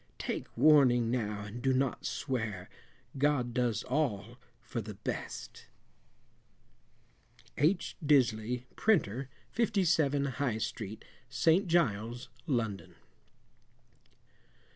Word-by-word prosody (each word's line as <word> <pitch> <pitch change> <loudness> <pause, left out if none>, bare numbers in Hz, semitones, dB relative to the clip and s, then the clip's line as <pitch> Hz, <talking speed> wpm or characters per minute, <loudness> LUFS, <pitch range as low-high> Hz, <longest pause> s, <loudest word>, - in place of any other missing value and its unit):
Take - - -4
warning 125 -6 +5
now 105 -4 -1
and 105 +4 -7
do 135 0 +2
not 130 -1 0
swear, 110 -9 -3 0.5
God 135 -4 +1
does 120 -3 0
all 125 -4 -2 0.2
for 120 0 -5
the 105 -1 -8
best. 105 - -6 1.9
H. 170 +6 +1
Disley, 125 -4 +2
Printer, 135 - +1 0.2
57, 170 - +2
High 130 -3 -1
Street, 110 -2 -5 0.2
St. 165 - +3
Giles, 120 -7 0 0.2
London. 115 -7 -2
125 Hz, 90 wpm, -31 LUFS, 110-145 Hz, 1.9 s, warning